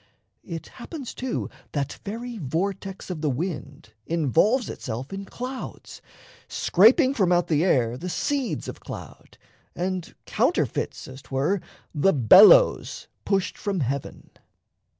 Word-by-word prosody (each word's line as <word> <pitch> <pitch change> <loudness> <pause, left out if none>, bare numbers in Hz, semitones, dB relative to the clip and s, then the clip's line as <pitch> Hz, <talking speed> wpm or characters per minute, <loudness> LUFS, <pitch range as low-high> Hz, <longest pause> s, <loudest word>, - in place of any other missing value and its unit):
It 165 -2 -7
happens 270 +1 -8
too 255 -1 -3 0.3
That 145 -1 -3
very 230 +2 -6
vortex 190 +6 -3
of 165 -4 -5
the 155 - +1
wind 150 0 -5
involves 170 - +2
Itself 125 +9 -6
in 195 0 -5
clouds, 255 +6 -7 0.5
scraping 255 - +4
from 190 -9 +2
out 175 -1 +2
the 155 0 +2
air 125 -9 +2
The 180 - -5
seeds 275 +6 -2
of - - -7
cloud, - - -10 0.4
and 185 -1 -3
counterfeits, - - -1
as 130 +1 -10
'twere, 145 +10 -1 0.3
The 170 +5 +3
"bellows" 190 - +6 0.2
pushed 195 -2 0
from 200 -5 -2
heaven. 135 +1 -4
180 Hz, 125 wpm, -25 LUFS, 145-215 Hz, 0.5 s, bellows